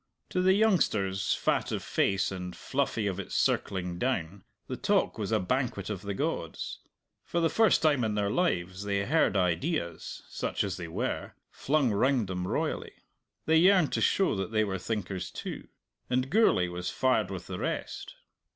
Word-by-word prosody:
To 180 - 0
the 190 +1 +5
youngsters, 105 - +2
fat - - 0
of - - -2
face 95 0 +1
and 90 -2 -5
fluffy 130 -5 -1
of 100 -3 -1
its - - -5
circling 90 -2 0
down, 95 -7 -2 0.2
the 130 - -4
talk 200 - +1
was 105 0 -2
a 110 - +3
banquet 110 -1 -1
of 95 -3 -4
the 100 0 -4
gods. - - -3 0.4
For 170 - -2
the 165 -1 +2
first 220 -7 +4
time 145 -5 +3
in 110 -2 0
their 100 -1 0
lives 95 - 0
they 100 -1 0
heard 150 -7 +3
ideas 90 - -1
(such - - -2
as 95 -3 -3
they 85 -2 -5
were) 80 - -3 0.2
flung 140 -4 +1
round 125 +3 +2
them 90 -1 -3
royally. - - -2 0.5
They 160 0 +4
yearned 180 -1 +5
to - - 0
show 195 - +3
that 95 +2 -3
they 110 -1 +3
were 95 -2 -2
thinkers 95 -2 -3
too. - - -7 0.4
And 130 +2 0
Gourlay 185 - +4
was 90 0 -4
fired 130 -6 +1
with 95 -3 -6
the - - -6
rest. - - -4
105 Hz, 175 wpm, -29 LUFS, 95-140 Hz, 0.5 s, the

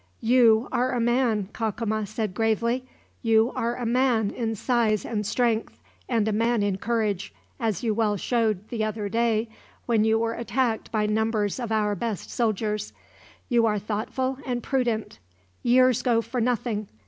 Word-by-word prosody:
"You 230 -1 +5
are 250 +1 +1
a 245 - 0
man," 235 -4 +1
Cacama 220 -1 -2
said 215 -1 -3
gravely. 235 +4 0 0.3
"You 225 +1 +3
are 235 +1 -1
a 245 - -4
man 235 -3 +2
in 225 -2 -2
size 220 -2 +1
and 210 -3 -2
strength, 230 -1 0 0.3
and 225 -4 +1
a - - +1
man 230 0 +1
in 200 -1 -1
courage; 215 -5 -1 0.2
as 220 -5 -1
you 225 -2 +1
well 210 -1 +1
showed, 215 -2 0
the 225 -3 -2
other 215 -1 -2
day, 230 +1 +1 0.4
when 225 -3 +2
you 220 0 +3
were 230 0 0
attacked 235 0 -1
by 215 -2 +1
numbers 215 0 0
of 235 -3 -4
our 210 -1 +1
best 210 0 -4
soldiers. 215 -2 -1 0.5
You 235 -2 +3
are 210 -1 +1
thoughtful 235 +6 -2
and 245 -2 -3
prudent. 240 -5 -1 0.4
Years 255 0 +4
go 230 -3 +2
for 235 +2 -3
nothing. 225 -3 -1
225 Hz, 160 wpm, -25 LUFS, 215-240 Hz, 0.5 s, You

